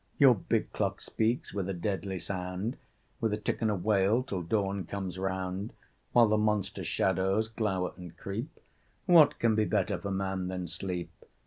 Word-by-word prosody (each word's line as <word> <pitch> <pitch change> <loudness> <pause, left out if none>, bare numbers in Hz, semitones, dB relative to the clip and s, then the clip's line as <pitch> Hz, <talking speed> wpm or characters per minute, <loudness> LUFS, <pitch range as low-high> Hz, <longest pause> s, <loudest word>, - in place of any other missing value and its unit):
Your 135 -4 +8
big 100 - -1
clock - - -1
speaks 115 +3 -1
with 95 -2 -2
a 95 - -2
deadly 95 +1 -2
sound, 90 +5 -3 0.4
With 110 -2 0
a - - 0
tick 105 - -2
and 110 - +2
a 105 - +1
wail 100 +4 +2
till 100 -9 -3
dawn 100 +2 0
comes 95 0 -5
round. 95 +2 -3 0.4
While 120 -1 +6
the 105 0 +2
monster 105 -2 0
shadows 95 +3 +1
glower 100 -5 -1
and 90 -2 -11
creep, 110 +12 -5 0.5
What 170 -5 +7
can 115 -1 +3
be 110 0 +2
better 85 - 0
for 100 - -4
man 95 -1 -1
than 90 -1 -3
sleep?" 90 +1 -4
100 Hz, 175 wpm, -30 LUFS, 95-110 Hz, 0.5 s, Your